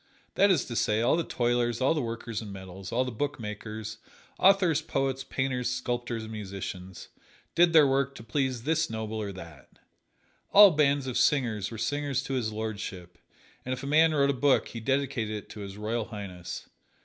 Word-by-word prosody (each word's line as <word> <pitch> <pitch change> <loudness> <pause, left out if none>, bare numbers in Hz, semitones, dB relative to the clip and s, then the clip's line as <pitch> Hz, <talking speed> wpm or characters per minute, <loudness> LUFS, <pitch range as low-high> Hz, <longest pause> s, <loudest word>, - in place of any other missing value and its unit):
That 200 - +4
is 175 -8 +3
to 120 - -6
say, 110 0 +1
all 120 - +4
the 170 - 0
toilers, 120 -3 0
all 130 +4 +3
the 155 - -1
workers 115 -1 -4
in 105 -2 -8
metals, 95 0 -9
all 125 +2 +1
the 125 - -4
bookmakers, 110 -4 -5 0.4
authors, 185 -5 +4
poets, 135 -3 -1
painters, 130 -2 -1
sculptors 120 -2 -3
and 110 - -8
musicians, 95 -3 -7 0.4
did 175 0 +5
their 155 -3 +7
work 135 0 +1
to - - -10
please 125 +1 -1
this 160 +3 +1
noble 110 -1 -4
or 100 -1 -4
that. 85 -6 -11 0.8
All 200 -1 +10
bands 145 -3 +2
of 130 -2 -1
singers 115 -8 +2
were 115 - -7
singers 140 +3 -1
to 135 - -4
His 120 -4 -1
Lordship, 100 -5 -6 0.4
and 130 - -2
if 130 - -6
a - - -4
man 155 +3 +5
wrote 140 -2 +3
a - - -2
book 135 +1 +2
he 115 - -6
dedicated 130 -3 -1
it 105 - -8
to - - -9
His 100 -1 -7
Royal 110 +2 -2
Highness. 95 -6 -7
120 Hz, 185 wpm, -28 LUFS, 105-140 Hz, 0.8 s, All